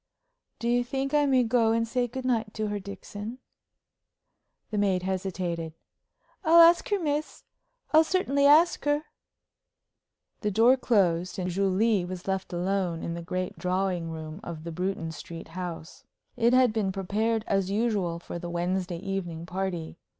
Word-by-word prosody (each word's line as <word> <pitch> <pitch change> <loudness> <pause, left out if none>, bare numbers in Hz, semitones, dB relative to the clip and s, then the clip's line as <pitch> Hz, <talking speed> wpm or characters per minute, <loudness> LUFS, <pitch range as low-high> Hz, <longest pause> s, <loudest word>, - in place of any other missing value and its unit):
"Do 235 - -3
you 245 +1 +3
think 270 +3 -3
I 295 -1 +4
may 260 -2 +4
go 230 -1 +3
and 230 0 +1
say 245 +1 0
good 255 +2 -6
night 225 -4 0
to 215 -1 -2
her, 205 0 -2
Dixon?" 205 +3 -7 1.3
The 210 - 0
maid 190 -3 +1
hesitated. 180 -4 -3 0.7
"I'll 335 0 +6
ask 335 +1 +7
her, 410 -1 +1
miss 300 -2 -2 0.5
I'll 315 +1 +8
certainly 285 -5 +2
ask 320 +4 +5
her." 290 +1 +2 1.4
The 210 - -1
door 230 +6 +5
closed, 185 -8 +1
and 180 -1 -2
Julie 195 +2 +2
was 180 +1 -7
left 190 -1 -2
alone 180 -1 -1
in 170 - -3
the 170 - -5
great 185 +1 -4
drawing 180 -2 -1
room 160 +1 -7
of 165 -5 -7
the 170 - -5
Bruton 180 -1 -3
Street 165 +1 -9
house. 170 -2 -7 0.3
It 235 +1 +3
had 255 -3 +5
been 210 -4 0
prepared 210 +4 -1
as 195 -1 0
usual 200 -5 0
for 170 0 -7
the 175 0 -6
Wednesday 175 +1 -2
evening 175 -3 -4
party. 175 -2 -4
195 Hz, 155 wpm, -27 LUFS, 175-235 Hz, 1.4 s, I'll